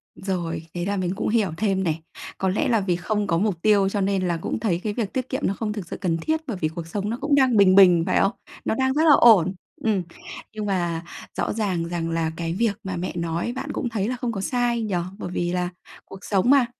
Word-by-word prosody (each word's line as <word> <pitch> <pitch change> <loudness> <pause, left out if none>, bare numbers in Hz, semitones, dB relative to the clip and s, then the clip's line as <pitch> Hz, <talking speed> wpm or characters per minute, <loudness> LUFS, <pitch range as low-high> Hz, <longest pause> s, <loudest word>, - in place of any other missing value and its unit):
Rồi, 170 -4 -3
thế 175 0 -3
là 200 0 -1
mình 180 -2 -1
cũng - - -2
hiểu 215 -6 +2
thêm 195 -3 +1
này. 160 -2 -1 0.4
Có 190 - 0
lẽ 190 - 0
là 230 -3 +3
vì 180 -3 0
không 205 +3 -1
có 165 - +2
mục 190 -3 0
tiêu 200 -2 +4
cho 200 0 -1
nên 190 -1 +1
là 170 -1 0
cũng - - -3
thấy 180 -6 0
cái 210 -1 -1
việc 210 -4 -3
tiết 260 -1 -2
kiệm 260 - -2
nó 195 - 0
không 210 0 -3
thực 200 -6 -6
sự - - -6
cần 170 -4 0
thiết 315 - -1
bởi 225 -7 -3
vì 155 - +2
cuộc 165 +1 -7
sống 205 +4 -3
nó 235 - -2
cũng 290 -1 +2
đang 260 -5 +4
bình 185 -2 +6
bình, 180 -4 +7
phải 185 - +2
không? 195 - +3 0.3
Nó - - +1
đang 265 +2 +1
rất 310 +2 +2
là 300 - +8
ổn. 195 -6 +6 0.3
Ừm, 210 -5 +1 0.5
nhưng 215 -1 -4
mà 175 -4 -1 0.3
rõ - - 0
ràng 195 -6 -1
rằng 170 -1 -2
là 165 -1 0
cái 165 -1 -2
việc 215 +2 +1
mà 190 -1 -4
mẹ 180 +2 -3
nói 170 +6 -2
bạn - - -5
cũng 245 - -2
thấy 210 -3 -1
là 255 - -1
không 245 -1 -3
có 195 - -4
sai 240 +2 0
nhỉ? 210 -4 -2 0.2
Bởi - - -5
vì 175 -1 -1
là 180 -1 0 0.4
cuộc 195 - -11
sống 200 +4 +2
mà, 275 -3 +6
195 Hz, 260 wpm, -24 LUFS, 175-220 Hz, 0.5 s, là